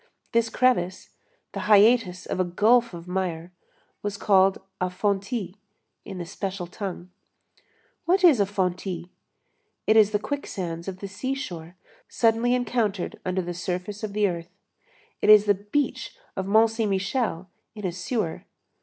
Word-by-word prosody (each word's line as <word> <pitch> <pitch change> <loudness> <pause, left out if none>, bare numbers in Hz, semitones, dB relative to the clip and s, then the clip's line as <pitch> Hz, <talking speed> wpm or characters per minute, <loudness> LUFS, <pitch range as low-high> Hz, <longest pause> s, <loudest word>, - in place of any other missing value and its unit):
This 230 0 +2
crevice, 225 -7 +1 0.4
the - - -5
hiatus 210 -3 +5
of - - -3
a - - +4
gulf 225 +7 +3
of 170 +1 -10
mire, 180 -2 -3 0.5
was 205 -1 -3
called 195 -2 +4 0.2
a 185 - +1
fontis, 200 +1 -2 0.5
in 195 - -8
the 175 - -5
special 190 +1 -4
tongue. 180 -1 -7 0.9
What 370 +2 +2
is 315 -10 +7
a 200 - +3
fontis? 185 -2 -2 0.8
It 220 - +4
is 215 -2 +6
the 210 - +1
quicksands 185 -10 -5
of 190 -1 -6
the 200 - -4
seashore 195 - -5 0.3
suddenly 230 +2 +2
encountered 225 -6 -1
under 185 0 -1
the 175 0 -4
surface 180 +3 -4
of 215 -2 -4
the 210 0 +2
earth; 170 -2 -5 0.7
it - - +2
is 210 -1 +9
the 205 - +5
beach 205 - -2 0.2
of 190 -1 -3
Mont 220 +2 +5
Saint 225 -1 -1
Michel 195 -1 -1 0.2
in 210 -2 -6
a 180 - 0
sewer. 185 0 -3
200 Hz, 150 wpm, -25 LUFS, 180-225 Hz, 0.9 s, is